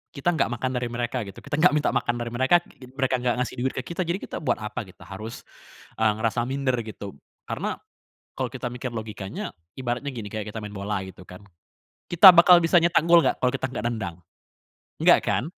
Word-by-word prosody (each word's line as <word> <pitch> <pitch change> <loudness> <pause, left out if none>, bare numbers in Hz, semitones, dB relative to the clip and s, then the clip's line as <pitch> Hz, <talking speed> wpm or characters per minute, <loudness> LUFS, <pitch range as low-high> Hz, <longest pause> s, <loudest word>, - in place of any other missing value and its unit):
kita 155 +6 +1
enggak 160 - +1
makan 130 +2 -2
dari 125 - -2
mereka 120 +1 -3
gitu, 100 - -10
kita 145 0 -3
enggak 160 -3 +5
minta 150 - +2
makan 120 - 0
dari 120 -1 -4
mereka, 130 +8 +3 0.4
mereka 130 -1 +1
enggak 125 -1 0
ngasih 125 - -3
duit 130 +1 -1
ke 135 - -3
kita, 170 +2 -4
jadi 175 +3 0
kita - - -6
buat 150 - 0
apa 105 - -4
kita 95 - -16
harus 110 +4 -8 0.6
eee, 110 -1 +4
ngerasa 115 +1 0
minder 135 -1 -1
gitu. 100 -6 -8 0.3
Karena - - -3 0.6
kalau - - -3
kita - - -6
mikir 125 0 -5
logikanya, 110 -4 -6 0.3
ibaratnya 130 +2 -3
gini 115 -6 -7
kayak 110 -1 -4
kita 110 - -7
main 105 0 -8
bola 100 0 -3
gitu 95 - -12
kan, 90 +2 -12 0.7
kita 175 +3 +10
bakal 175 0 +7
bisa 165 +2 +5
nyetak 170 0 +3
gol 170 0 +8
enggak - - +2
kalau 125 - +3
kita 135 -1 -2
enggak 130 - -5
nendang? 100 -8 -4 0.9
Enggak - - +7
kan? - - +1
125 Hz, 205 wpm, -25 LUFS, 110-140 Hz, 0.9 s, kita